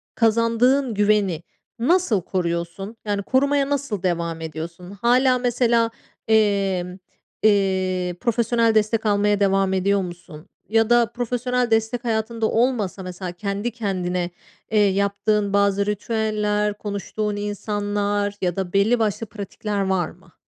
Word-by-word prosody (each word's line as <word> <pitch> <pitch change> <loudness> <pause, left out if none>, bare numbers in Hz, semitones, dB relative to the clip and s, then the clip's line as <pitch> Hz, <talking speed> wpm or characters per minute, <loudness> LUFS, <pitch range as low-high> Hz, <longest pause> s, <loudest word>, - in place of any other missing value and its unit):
kazandığın 230 +3 +2
güveni 205 -5 +2 0.4
nasıl 255 - +2
koruyorsun? 170 +4 -3
Yani, 205 -1 -1
korumaya 275 +2 +2
nasıl 280 -9 -2
devam 170 -2 -1
ediyorsun? 165 +3 -7
Hâlâ, 250 +5 +3
mesela, 240 -2 +2 0.4
emm, 195 -4 +1 0.5
eee, 190 -3 +2
profesyonel 230 -1 +2
destek 215 +1 +2
almaya 205 -1 +2
devam 195 -1 +2
ediyor 195 +1 +2
musun? 175 -3 -9 0.2
Ya 225 +1 +3
da 240 0 +5
profesyonel 245 +1 -2
destek 225 +2 +1
hayatında 225 -1 -1
olmasa, 225 -6 0
mesela, 180 0 -6
kendi 200 +5 -3
kendine, 180 -5 -2 0.4
eee, 215 - +3
yaptığın 200 +1 0
bazı 200 0 +2
ritüeller, 210 -1 -1
konuştuğun 210 0 -3
insanlar 205 0 -2
ya 180 -2 0
da 190 -2 -3
belli 220 +5 +3
başlı 220 +1 0
pratikler 205 0 -4
var 190 -4 0
mı? 175 -1 -19
205 Hz, 120 wpm, -22 LUFS, 190-230 Hz, 0.5 s, da